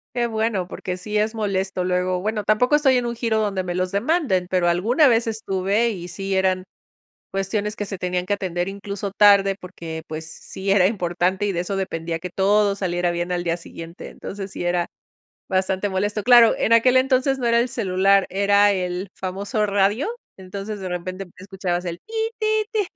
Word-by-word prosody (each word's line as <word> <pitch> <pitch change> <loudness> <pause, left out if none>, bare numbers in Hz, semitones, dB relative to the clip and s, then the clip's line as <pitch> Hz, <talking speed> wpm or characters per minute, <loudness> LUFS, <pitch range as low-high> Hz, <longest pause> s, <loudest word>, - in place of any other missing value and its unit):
Que 240 -1 +1
bueno, 220 -4 -1
porque 180 0 -5
sí 210 +3 -5
es 215 +2 0
molesto. 195 -3 -1
Luego, 180 0 0
bueno, 215 +2 -2
tampoco 230 +7 +2
estoy 280 -3 +4
en 245 -1 0
un 235 - -2
giro 230 -2 0
donde 200 -3 0
me 180 -1 -4
los 185 +1 -1
demanden, 205 - +1
pero 180 -2 +2
alguna 220 - +3
vez 230 -2 +3
estuve 210 +1 0
y 180 -5 -6
sí 195 +2 -4
eran 185 -1 +1 0.7
cuestiones 200 +2 -2
que 205 - -4
se 195 - -5
tenían 180 0 -2
que 205 - +1
atender 180 -2 -2
incluso 200 0 -5
tarde 200 -1 +5
porque, 165 -3 -8
pues, 160 +1 -7
sí 190 +4 -6
era 195 -2 +5
importante 185 -1 0
y 200 - 0
de 175 - -1
eso 195 +2 -3
dependía 165 -3 -3
que 180 +2 -6
todo 200 +3 +2
saliera 175 -3 -1
bien 175 +1 -2
al 175 0 -1
día 170 0 0
siguiente. 165 0 -10
Entonces, 195 -1 -7
sí - - -6
era 175 0 0 0.6
bastante 190 +1 0
molesto. 205 +3 -1
Claro, 240 0 +7
en 230 - +1
aquel 245 +3 +5
entonces 265 +1 +2
no 245 - -2
era 235 0 +4
el 240 - 0
celular, 195 -3 +2
era 200 +1 +4
el 180 0 -3
famoso 200 +3 -2
radio, 205 - +1 0.3
entonces 195 +2 -6
de 190 - -4
repente 185 +2 -5
escuchabas 185 -2 -3
el 170 -1 -4
ti, 450 - -11 0.2
ti, 435 -1 +1
ti. 425 -3 0
195 Hz, 190 wpm, -22 LUFS, 180-215 Hz, 0.7 s, Claro